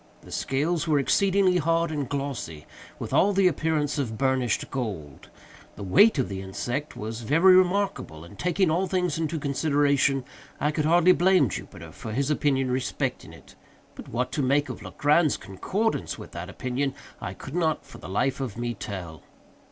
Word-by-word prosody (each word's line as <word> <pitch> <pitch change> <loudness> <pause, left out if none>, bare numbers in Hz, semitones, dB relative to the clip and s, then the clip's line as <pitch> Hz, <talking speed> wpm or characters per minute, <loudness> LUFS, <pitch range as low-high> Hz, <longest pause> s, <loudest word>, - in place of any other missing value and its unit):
The - - -13
scales 155 +4 -1
were 155 -2 +3
exceedingly 190 +5 +3
hard 165 0 +1
and 145 -5 -3
glossy, 135 - -4 0.3
with - - -6
all 205 +1 +4
the 195 -1 +4
appearance 155 -3 0
of 115 -6 -3
burnished 130 -2 0
gold. 95 - -5 0.5
The 100 - -8
weight 180 - +5
of 130 - +1
the 95 -1 -5
insect 120 +9 -4
was 110 +2 -5
very 165 - +5
remarkable, 185 - +1
and, 85 +4 -14
taking 180 -1 +1
all 180 +4 +1
things 180 -5 0
into 165 0 -1
consideration, 140 -2 +1 0.3
I 150 - +1
could 155 -1 -1
hardly 175 +3 +5
blame 180 - +4
Jupiter - - -8
for 110 - -7
his 140 +4 0
opinion 135 -3 +1
respecting 130 0 -2
it; - - -16 0.4
but - - -11
what 125 +2 -2
to 145 - -1
make 140 +2 +2
of - - -7
Legrand's 150 +1 +2
concordance 200 - -2
with - - -10
that 85 +3 -7
opinion, 130 +5 -2 0.3
I - - -5
could 135 - -9
not, 160 -3 0
for - - -13
the - - -9
life 125 +9 0
of 120 -5 -4
me, 120 0 -2
tell. 90 -8 -7
140 Hz, 175 wpm, -26 LUFS, 120-165 Hz, 0.5 s, weight